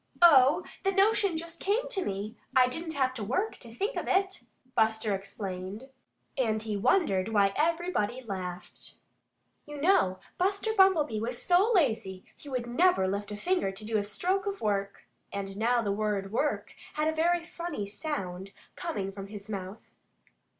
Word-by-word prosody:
"Oh, 290 Hz, +1 st, +7 dB, 0.2 s
the 390 Hz, -, +1 dB
notion 395 Hz, -2 st, +3 dB
just 335 Hz, +1 st, -7 dB
came 450 Hz, +6 st, 0 dB
to 390 Hz, -6 st, 0 dB
me. 200 Hz, -, -4 dB, 0.2 s
I 255 Hz, -1 st, +6 dB
didn't 320 Hz, +5 st, -5 dB
have 260 Hz, -2 st, +1 dB
to 230 Hz, -4 st, -4 dB
WORK, 325 Hz, -, -1 dB
to 235 Hz, -, -12 dB
think 400 Hz, -, -2 dB
of -, -, -3 dB
it," 385 Hz, 0 st, +1 dB, 0.3 s
Buster 220 Hz, -2 st, +2 dB
explained. 195 Hz, +4 st, -6 dB, 0.4 s
And 220 Hz, -5 st, 0 dB
he 215 Hz, -2 st, -2 dB
wondered 205 Hz, -, +2 dB
why 200 Hz, -2 st, +3 dB
everybody 325 Hz, -, 0 dB
laughed. 185 Hz, -4 st, -7 dB, 0.7 s
You 295 Hz, -1 st, -7 dB
know, 280 Hz, -, +3 dB, 0.2 s
Buster 395 Hz, +4 st, +1 dB
Bumblebee 335 Hz, -, +4 dB
was 240 Hz, +2 st, -3 dB
so 370 Hz, +6 st, +3 dB
lazy 220 Hz, -, +1 dB, 0.2 s
that 255 Hz, -4 st, -3 dB
he 240 Hz, -, -8 dB
never 350 Hz, -, +4 dB
would 190 Hz, -, +1 dB
lift 200 Hz, +1 st, -3 dB
a 205 Hz, -, -4 dB
finger 360 Hz, -, 0 dB
to 195 Hz, +2 st, -8 dB
do 220 Hz, 0 st, +1 dB
a -, -, -1 dB
stroke 370 Hz, -, -1 dB
of 400 Hz, 0 st, -3 dB
work. 200 Hz, -1 st, -2 dB, 0.3 s
And 195 Hz, -1 st, -5 dB
now 235 Hz, +3 st, +2 dB
the 200 Hz, -, 0 dB
word 200 Hz, -1 st, -1 dB
"work" 290 Hz, +6 st, -1 dB, 0.2 s
had 305 Hz, +1 st, +1 dB
a 315 Hz, -, +1 dB
very 340 Hz, +2 st, +1 dB
funny 340 Hz, -, -5 dB
sound, 200 Hz, -, -5 dB, 0.2 s
coming 205 Hz, -, -3 dB
from 195 Hz, 0 st, -8 dB
his 205 Hz, +1 st, -9 dB
mouth. 195 Hz, +1 st, -7 dB
240 Hz, 170 wpm, -29 LUFS, -, 0.7 s, Oh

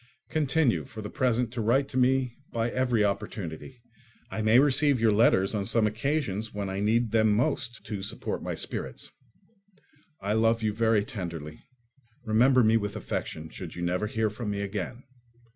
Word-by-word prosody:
Continue 150 Hz, -3 st, +2 dB
for 110 Hz, -1 st, -9 dB
the 105 Hz, -, -6 dB
present 125 Hz, -2 st, 0 dB
to 120 Hz, -, -2 dB
write 130 Hz, +6 st, +2 dB
to -, -, -10 dB
me 130 Hz, -1 st, +2 dB, 0.2 s
by 115 Hz, 0 st, -1 dB
every 125 Hz, -4 st, +2 dB
opportunity: 100 Hz, +3 st, -4 dB, 0.5 s
I 110 Hz, -, -3 dB
may 110 Hz, +2 st, +5 dB
receive 140 Hz, 0 st, +4 dB
your 115 Hz, -1 st, +4 dB
letters 105 Hz, -2 st, +3 dB
on 105 Hz, -2 st, -1 dB
some 110 Hz, +3 st, +2 dB
occasions 110 Hz, -2 st, -1 dB
when 100 Hz, -2 st, -4 dB
I 95 Hz, -, -3 dB
need 110 Hz, +2 st, +1 dB
them 110 Hz, -1 st, +4 dB
most 125 Hz, +1 st, 0 dB
to 105 Hz, -3 st, -4 dB
support 105 Hz, +3 st, -4 dB
my -, -, -3 dB
spirits. 65 Hz, -1 st, -5 dB, 1.1 s
I 100 Hz, +2 st, -1 dB
love 115 Hz, +1 st, +2 dB
you 105 Hz, -1 st, +1 dB
very 110 Hz, -1 st, +2 dB
tenderly. 85 Hz, -8 st, -6 dB, 0.6 s
Remember 125 Hz, +4 st, +4 dB
me 110 Hz, +1 st, +5 dB
with 105 Hz, -2 st, -3 dB
affection, 80 Hz, 0 st, -4 dB
should -, -, -8 dB
you 85 Hz, -, -5 dB
never 90 Hz, +4 st, 0 dB
hear 110 Hz, -1 st, 0 dB
from 110 Hz, 0 st, -5 dB
me 100 Hz, -1 st, -2 dB
again. 100 Hz, +5 st, -4 dB
110 Hz, 170 wpm, -28 LUFS, 105-125 Hz, 1.1 s, may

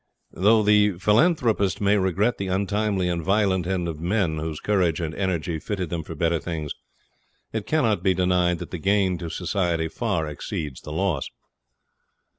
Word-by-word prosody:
Though 105 Hz, +4 st, +4 dB
the 105 Hz, -1 st, +4 dB
philanthropist 110 Hz, -, +2 dB
may 100 Hz, 0 st, +3 dB
regret 100 Hz, +4 st, +1 dB
the 100 Hz, -, -2 dB
untimely 100 Hz, 0 st, 0 dB
and 85 Hz, -1 st, -1 dB
violent 95 Hz, -1 st, +1 dB
end 90 Hz, -2 st, -1 dB
of 80 Hz, -2 st, -5 dB
men 85 Hz, -2 st, 0 dB
whose 80 Hz, -1 st, -4 dB
courage 90 Hz, -6 st, +1 dB
and 80 Hz, -2 st, -3 dB
energy 85 Hz, -4 st, -2 dB
fitted 95 Hz, -2 st, -4 dB
them 85 Hz, -2 st, -2 dB
for 80 Hz, +1 st, -8 dB
better 85 Hz, +2 st, +1 dB
things, 80 Hz, -4 st, -4 dB, 0.8 s
it 110 Hz, -1 st, -3 dB
cannot 115 Hz, -, +2 dB
be 95 Hz, -1 st, +2 dB
denied 90 Hz, -1 st, +2 dB
that -, -, -8 dB
the 90 Hz, -, -4 dB
gain 95 Hz, -1 st, +1 dB
to 85 Hz, -, -5 dB
society 85 Hz, -2 st, -1 dB
far 80 Hz, 0 st, -1 dB
exceeds 75 Hz, -2 st, -5 dB
the 75 Hz, -, -8 dB
loss. 85 Hz, -3 st, -1 dB
95 Hz, 165 wpm, -24 LUFS, 85-100 Hz, 0.8 s, Though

